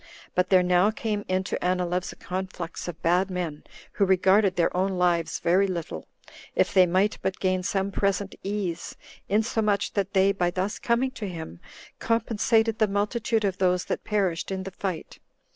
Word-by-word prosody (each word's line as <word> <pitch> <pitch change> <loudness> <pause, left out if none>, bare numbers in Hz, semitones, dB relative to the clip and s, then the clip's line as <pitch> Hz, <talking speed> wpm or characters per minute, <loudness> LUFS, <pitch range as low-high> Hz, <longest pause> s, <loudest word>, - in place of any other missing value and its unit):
But 180 - +1
there 185 -2 +5
now 180 +2 +4
came 215 -1 -2
in 185 0 0
to - - -4
Anileus 180 0 0
a - - -12
conflux 185 -2 -5
of 170 -1 -6
bad 180 +3 +2
men, 175 -5 -4 0.3
who 205 - 0
regarded 190 +1 +4
their 170 0 +1
own 190 +1 +1
lives 175 -2 +1
very 185 +4 +3
little, 175 -4 -5 0.5
if - - +2
they 185 -2 +6
might 190 +4 +1
but 190 - -2
gain 185 -1 +1
some 195 +2 -1
present 200 0 0
ease, 195 -4 -3 0.3
insomuch 210 -1 +1
that 200 -1 -1
they, 195 +1 +4
by 180 -3 0
thus 185 +4 -2
coming 245 +2 +1
to 225 -6 -6
him, 160 - -7 0.4
compensated 225 0 +1
the 215 - +4
multitude 210 +2 0
of 190 -2 -1
those 180 -1 +2
that - - -3
perished 190 -6 -1
in 190 -1 -3
the 195 - -6
fight. 185 -3 -5
190 Hz, 175 wpm, -26 LUFS, 180-205 Hz, 0.5 s, they